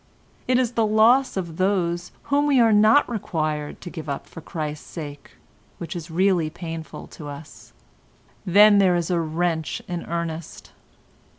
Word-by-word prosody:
It 255 - +3
is 250 -2 +1
the 230 -2 +1
loss 220 +4 +4
of 170 -4 -4
those 180 -2 0 0.2
whom 290 +1 +3
we 275 -3 +4
are 225 -2 +5
not 215 +7 +5
required 155 -9 -3
to 175 - -8
give 160 -3 -7
up 140 - -4
for 165 - -11
Christ's 155 -1 -6
sake 145 -4 -8 0.4
which 170 +1 -7
is 170 -1 -6
really 175 -1 +2
painful 165 -1 -7
to 150 - -10
us. 145 +1 -11 0.7
Then 205 +3 +6
there 185 -2 +4
is 175 +1 -1
a 175 - +2
wrench 165 0 -1
in 175 -1 -4
earnest. 170 -1 -5
175 Hz, 160 wpm, -23 LUFS, 160-210 Hz, 0.7 s, Then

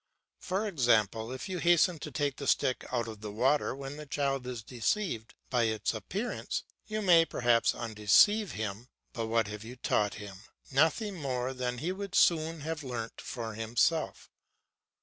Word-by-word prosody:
For 195 +3 -1
example, 115 - +2
if 130 +9 -5
you 185 -2 -3
hasten 175 0 +4
to 150 - -6
take 140 0 -1
the 140 - -5
stick 130 - +1
out 120 -2 0
of 110 -2 -8
the 105 - -5
water 130 +6 +2
when 135 +1 -7
the 150 0 -8
child 135 -2 -1
is 120 -3 -5
deceived 120 - -2 0.2
by 120 -3 +3
its 110 0 0
appearance, 195 - -3 0.2
you 215 0 -2
may 170 -4 +7
perhaps 120 -6 +2
undeceive 120 - +4
him, 110 +2 -4 0.3
but 115 -2 -3
what 115 0 +2
have 105 0 -7
you 120 +3 -9
taught 105 -4 0
him? 100 -2 -8 0.3
Nothing 170 - +2
more 130 -3 -2
than 125 -1 -3
he 165 +9 -2
would 200 +1 -5
soon 160 -1 +3
have 160 +1 -3
learnt 120 -4 -5
for 115 -3 -5
himself. 115 +9 0
130 Hz, 170 wpm, -30 LUFS, 115-165 Hz, 0.3 s, may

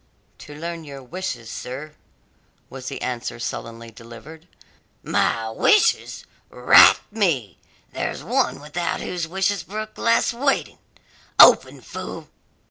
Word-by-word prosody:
"To 145 - -11
learn 165 +1 -6
your 140 -3 -10
wishes, 130 -6 -6
sir," 140 +5 -7 0.8
was 130 -1 -9
the 135 - -6
answer 125 -2 -4
sullenly 115 -1 -6
delivered. 120 +9 -13 0.6
"My 115 -1 0
wishes! 425 - +2 0.2
Rat - - +7
me, 160 - -1 0.3
there's - - -4
one - - 0
without 150 +4 -3
whose 175 -2 -4
wishes 190 +3 -1
brook 215 +2 -7
less 230 0 +2
waiting! 275 +3 -1 0.6
Open, - - +7
fool!" - - -8
150 Hz, 115 wpm, -22 LUFS, 120-190 Hz, 0.8 s, Rat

